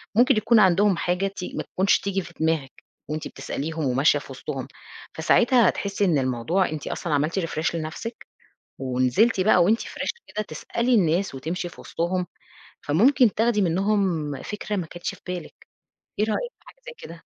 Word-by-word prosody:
ممكن 245 +1 +5
يكون 225 +2 +4
عندهم 190 -1 +4
حاجة 180 +3 0
تي 195 -2 -7
ما - - -2
تكونش 190 +2 +2
تيجي 195 -1 -1
في 170 - -12
دماغِك 160 -4 -1 0.3
وأنتِ 155 +1 -3
بتسأليهم 160 +1 -4
وماشية 135 +3 +3
في - - -12
وسطهم، - - -5 0.5
فساعتها 240 -5 +4
هتحسي 200 0 -1
إن 165 -5 +3
الموضوع 130 +9 0
أنتِ 150 -2 -5
أصلًا 170 -4 -3
عملتِ 150 +6 +1
refresh 165 -1 -2
لنفسِك، 165 +9 -6 0.5
ونزلتِ 130 - +2
بقى 185 -2 +5
وأنتِ 220 +6 +3
fresh - - -4 0.2
كده 215 - -3
تسألي 235 +10 -1
الناس 180 -3 +2
وتمشي 165 +6 -4
في - - -14
وسطهم، 180 +2 -2 0.6
فممكن 235 - +4
تاخدي 225 -1 +2
منُّهم 185 -4 +1
فكرة 210 0 -4
ما 180 -4 -2
كانتش 175 +1 -5
في - - -22
بالِك، 180 -1 -7 0.5
إيه 210 - +3
رأيك 480 - -2
في - - -31
حاجة - - -16
زي - - -6
كده؟ 165 0 -11
180 Hz, 165 wpm, -24 LUFS, 160-210 Hz, 0.6 s, ممكن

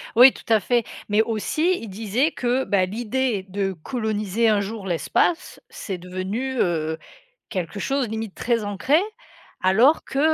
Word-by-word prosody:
Oui, 250 +3 +9
tout - - -13
à 220 - +5
fait 235 +3 +1 0.2
mais 210 +1 +4
aussi 305 - 0
il 225 - -7
disait 225 +9 0
que 250 +1 0
ben, 185 -3 +1
l'idée 235 -1 -1
de 195 0 -1
coloniser 215 - -1
un 210 -2 +3
jour 200 0 -5
l'espace, 255 - 0
c'est 195 -5 -5
devenu, 190 +9 -4
heu, 160 -2 0 0.5
quelque 185 +2 -4
chose 270 +3 0
limite 220 -2 -5
très 230 -3 0
ancré 205 +9 +2 0.6
alors 225 +12 +4
que, 270 - -3
220 Hz, 150 wpm, -23 LUFS, 195-250 Hz, 0.6 s, Oui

